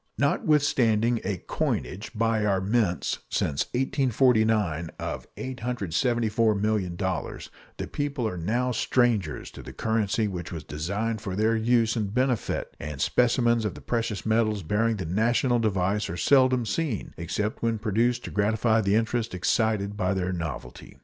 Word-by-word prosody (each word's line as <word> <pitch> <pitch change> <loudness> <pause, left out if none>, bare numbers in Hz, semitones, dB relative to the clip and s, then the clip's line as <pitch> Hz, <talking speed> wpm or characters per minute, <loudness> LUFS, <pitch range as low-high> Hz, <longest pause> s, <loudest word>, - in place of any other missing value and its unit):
Notwithstanding 120 -6 +2
a 100 -3 -2
coinage 100 +5 -2
by 115 0 +1
our 100 -2 +2
mints 100 -2 0
since 70 -2 0
1849 110 - +2
of - - -5
$874,000,000, 110 -5 -1 0.3
the - - -3
people 145 -5 -2
are 90 - -4
now 120 +9 0
strangers 115 -8 0
to - - -10
the - - -9
currency 110 -1 0
which 90 -4 -5
was 80 -4 -6
designed 100 +10 -3
for 95 -4 -4
their 110 +3 +2
use 115 0 +2
and 105 -4 -2
benefit, 125 0 -1
and 75 -2 -6
specimens 120 - +2
of 105 - -2
the - - -10
precious 115 -3 -2
metals 110 -3 +1
bearing 110 +6 +1
the 95 - -4
national 120 +7 +2
device 100 -1 0
are 85 - -4
seldom 130 +2 +4
seen, 140 -2 -2
except 105 +6 -3
when 115 -1 +1
produced 115 +3 +1
to - - -6
gratify 110 +2 +2
the 100 0 +2
interest 115 -1 0
excited 100 +3 +1
by 95 -1 0
their 95 0 -1
novelty. 75 -7 -6
110 Hz, 145 wpm, -26 LUFS, 95-120 Hz, 0.3 s, seldom